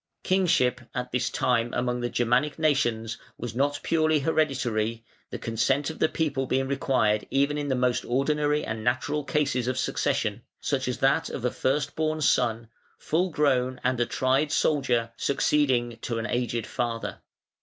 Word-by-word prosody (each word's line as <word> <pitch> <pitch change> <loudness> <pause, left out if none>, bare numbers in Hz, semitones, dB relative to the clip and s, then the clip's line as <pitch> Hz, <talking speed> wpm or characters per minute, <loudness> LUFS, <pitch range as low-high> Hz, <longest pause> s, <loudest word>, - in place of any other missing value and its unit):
Kingship 160 -10 +2
at 125 0 -3
this 120 -1 0
time 120 -1 +1
among 125 0 -1
the 120 - -1
Germanic 125 +5 +1
nations 120 -8 0 0.2
was 120 -1 -5
not 145 +4 0
purely 155 -1 +2
hereditary, 120 -7 0 0.2
the - - -5
consent 135 +6 0
of 160 - -12
the 155 - +3
people 140 -5 -1
being 135 +1 0
required 130 -6 +1
even 140 +2 +2
in 145 -1 -2
the 135 - +1
most 125 -1 +1
ordinary 150 +3 +1
and 110 0 -4
natural 130 +5 0
cases 135 -3 0
of 130 0 -1
succession, 130 - -1 0.2
such - - -1
as - - -1
that - - +2
of - - -5
a - - +1
first 145 +2 -1
born 155 0 0
son, 115 -5 +1 0.3
full 175 +4 0
grown 130 -5 +1
and 125 0 +1
a 120 - +1
tried 135 +3 +1
soldier 125 -8 +1
succeeding 130 -5 +1
to 115 - -3
an 115 - -2
aged 120 -2 -1
father. 115 -1 -3
130 Hz, 165 wpm, -26 LUFS, 120-145 Hz, 0.3 s, the